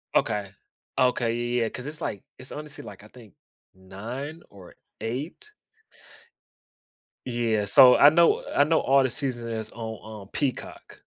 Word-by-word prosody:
Okay. 105 -2 0 0.5
Okay, 125 -3 +2
ye 120 +1 -1
yeah, 115 - 0
'cause 125 - -8
it's, 150 +1 -8
like 100 - -4
it's 130 - -11
honestly, 150 -1 -8
like, 100 0 -11
I - - -13
think 110 -4 -16 0.4
9? 115 - -8
Or 95 -3 -15 0.3
8? 145 - -5 1.8
Yeah, 115 -4 0
so 125 +5 +8
I 145 - +9
know 170 +2 +3
I 145 - +6
know 160 +2 +2
all 135 0 +4
the 130 - +1
season 120 -3 -3
is 110 -1 -4
on - - -17 0.2
on 105 -2 -10
Peacock. 135 -4 -4
120 Hz, 150 wpm, -26 LUFS, 110-140 Hz, 1.8 s, I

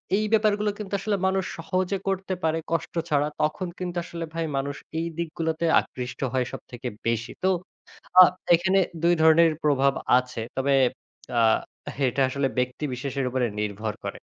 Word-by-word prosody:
এই 215 +2 +1
ব্যাপারগুলো 210 -1 +3
কিন্তু 205 -2 -7
আসলে 205 +1 0
মানুষ 190 0 +1
সহজে 185 +3 -1
করতে 190 0 -1
পারে 160 0 +2
কষ্ট 165 - -1 0.2
ছাড়া। 145 0 +2
তখন 155 +5 0
কিন্তু 180 -1 -4
আসলে 170 -1 -6
ভাই 165 0 -1
মানুষ 140 +1 -2 0.2
এই 165 - -1
দিকগুলোতে 165 0 -2
আকৃষ্ট 125 0 -6
হয় 130 -1 +1
সবথেকে 125 0 -7 0.2
বেশি। 115 0 -1
তো 190 - +4 0.7
আ - - +14 0.3
এখানে 190 +3 +2 0.2
দুই 170 +1 +5
ধরনের 160 +1 +6
প্রভাব 140 -2 +3 0.2
আছে। 125 -2 -2 0.2
তবে 140 +1 +2 0.7
আ - - +5 0.7
এটা 130 +2 0
আসলে 140 +1 0
ব্যক্তি 125 +3 -1
বিশেষের 135 +1 -3
উপরে 125 0 0
নির্ভর 105 +1 -2
করে। - - -4
160 Hz, 155 wpm, -25 LUFS, 130-185 Hz, 0.7 s, আ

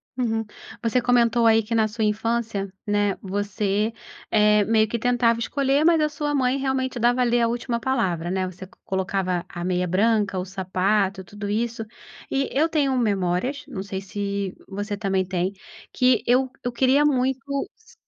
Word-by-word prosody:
Uhum. 225 -3 0 0.4
Você 230 +2 +2
comentou 240 -1 +3
aí 225 0 +5
que 220 +2 -3
na 220 -1 +3
sua 220 +1 -3
infância, 210 -2 -1
né, 205 -1 +1
você, 205 +2 -1 0.4
eh, 210 -1 +4
meio 220 -1 +3
que 235 - -2
tentava 235 -1 +2
escolher, 275 +4 +1
mas 330 -2 +5
a 305 - +2
sua 295 0 -3
mãe 260 -1 +2
realmente 265 -1 -1
dava 240 +2 +2
a - - +5
ler 240 0 +2
a 230 - +3
última 235 0 -2
palavra, 185 -10 -1
né, 185 -1 0
você 185 +1 -9
co 185 - -23
colocava 185 -2 -1
a 175 -1 -7
meia 180 0 0
branca, 205 0 +1
o 180 - -3
sapato, 190 +1 0
tudo 205 +2 -7
isso. 225 +2 -2 0.5
E 275 0 0
eu 305 +4 +2
tenho 280 -5 +1
memórias, 205 +4 0
não 190 - -5
sei 195 -1 -5
se 200 -1 -3
você 205 +1 -4
também 195 -2 0
tem, 185 +1 -1 0.4
que 250 -3 +3
eu 255 +2 +3
eu 245 - -1
queria 265 +4 +3
muito, 265 -2 +2 0.4
s 445 +2 -22
220 Hz, 175 wpm, -24 LUFS, 195-250 Hz, 0.5 s, aí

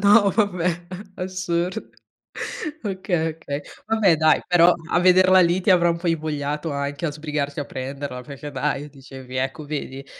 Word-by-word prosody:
No, 205 0 +6
vabbè, 180 -5 0 0.3
assur 180 -1 -1 1.1
Okay, 185 -5 -1
okay. 145 -2 -5 0.2
Vabbè, 215 -6 +3
dai, 155 0 +4
però 175 0 +6 0.2
a 175 - +3
vederla 185 +1 +6
lì 175 +1 +3
ti 190 - +1
avrà 175 -2 +5
un 170 - 0
po' 170 +1 -6
invogliato 150 -1 -2
anche 140 +3 -3
a - - -1
sbrigarsi 150 -1 -3
a 145 - -1
prenderla 135 0 -6
perché 145 +1 -8
dai, 145 +1 -2
dicevi 135 -2 -12
ecco 135 +4 -2
vedi. 140 -2 -5
160 Hz, 155 wpm, -23 LUFS, 140-180 Hz, 1.1 s, No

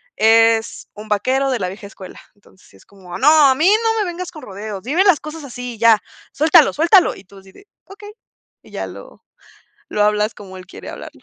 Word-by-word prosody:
es 225 0 +2
un 210 +1 -11
vaquero 260 +6 0
de 250 - -2
la 185 - -2
vieja 200 +2 -11
escuela. 190 -2 -13 0.2
Entonces 200 -2 -24
sí - - -23
es - - -23
como: 185 -3 -11
"¡No, 300 0 +5
a 260 - +2
mí 315 +6 +1
no 450 +1 +1
me - - -1
vengas 355 +1 -7
con 310 - -12
rodeos, 200 -1 -8
dime 310 +10 +1
las 380 -6 +3
cosas 305 0 -9
así 250 -2 -8
y - - -17
ya, 225 -1 +4 0.3
suéltalo, 310 +1 +4
suéltalo!", 345 +5 +3
y - - -15
tú 195 +1 -17
así 190 0 -18
de: 400 - -20 0.2
"Okey", 415 +2 -13 0.5
y - - -19
ya - - -5
lo, - - -13 0.7
lo 210 - -1
hablas 210 +1 0
como 190 -2 -12
él 185 0 -12
quiere - - -12
hablarlo. - - -12
230 Hz, 220 wpm, -18 LUFS, 205-315 Hz, 0.7 s, No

